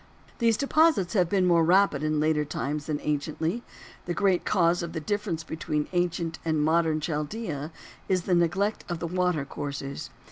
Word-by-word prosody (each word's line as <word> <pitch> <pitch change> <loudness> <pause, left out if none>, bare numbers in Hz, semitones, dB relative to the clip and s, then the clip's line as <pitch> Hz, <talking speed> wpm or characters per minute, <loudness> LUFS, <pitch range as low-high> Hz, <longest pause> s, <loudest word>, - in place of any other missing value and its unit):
These 230 -2 +3
deposits 280 - +3
have 180 -5 +2
been 190 -1 +2
more 170 -2 +4
rapid 180 -3 +4
in 155 0 0
later 155 0 +2
times 145 0 -3
than 150 -2 -1
anciently. 155 +7 -2 0.5
The 175 - -1
great 190 -3 +2
cause 175 -2 +2
of 170 -1 -5
the 160 - -2
difference 185 -1 -2
between 155 -2 -2
ancient 175 -2 -1
and 155 -2 +1
modern 160 0 +2
Chaldea 150 0 -3 0.4
is 185 -2 +2
the 185 - 0
neglect 180 +5 +1
of 175 - -2
the 170 - -4
water 180 -4 0
courses. 140 -1 -5
170 Hz, 170 wpm, -27 LUFS, 155-185 Hz, 0.5 s, more